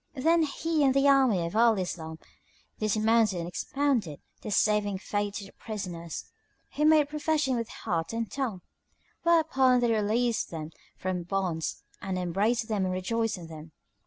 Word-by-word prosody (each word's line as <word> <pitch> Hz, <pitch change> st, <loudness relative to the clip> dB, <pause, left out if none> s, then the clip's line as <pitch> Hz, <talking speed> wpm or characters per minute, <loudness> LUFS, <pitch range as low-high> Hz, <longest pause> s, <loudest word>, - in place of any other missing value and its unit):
Then 325 Hz, +5 st, +3 dB
he 315 Hz, +1 st, 0 dB
and 265 Hz, -1 st, +3 dB
the 275 Hz, +1 st, +4 dB
army 260 Hz, -11 st, +4 dB
of 170 Hz, -, -5 dB
Al 230 Hz, -1 st, +5 dB
Islam 160 Hz, -3 st, -4 dB, 0.6 s
dismounted 215 Hz, -1 st, +2 dB
and 170 Hz, -, -4 dB
expounded 235 Hz, -, -1 dB, 0.2 s
The -, -, -6 dB
saving 205 Hz, -1 st, +2 dB
Faith 205 Hz, +1 st, -3 dB
to 200 Hz, -, -5 dB
the 195 Hz, -, -14 dB
prisoners, 175 Hz, -7 st, -6 dB, 0.5 s
who 300 Hz, -, +2 dB
made 310 Hz, -2 st, +5 dB
profession 300 Hz, -2 st, 0 dB
with 230 Hz, -1 st, -3 dB
heart 165 Hz, -1 st, -3 dB
and 230 Hz, 0 st, -2 dB
tongue; 240 Hz, -10 st, -3 dB, 0.6 s
whereupon 305 Hz, -7 st, +4 dB
they 240 Hz, -1 st, +2 dB
released 225 Hz, +2 st, +1 dB
them 160 Hz, -1 st, -6 dB, 0.3 s
from 185 Hz, -1 st, -2 dB
bonds 175 Hz, -3 st, -2 dB, 0.2 s
and 190 Hz, -2 st, -3 dB
embraced 200 Hz, +6 st, 0 dB
them 205 Hz, -4 st, 0 dB
and 185 Hz, -, -1 dB
rejoiced 225 Hz, +4 st, -1 dB
in 175 Hz, -, -9 dB
them. 160 Hz, -1 st, -11 dB
215 Hz, 160 wpm, -28 LUFS, 185-260 Hz, 0.6 s, Al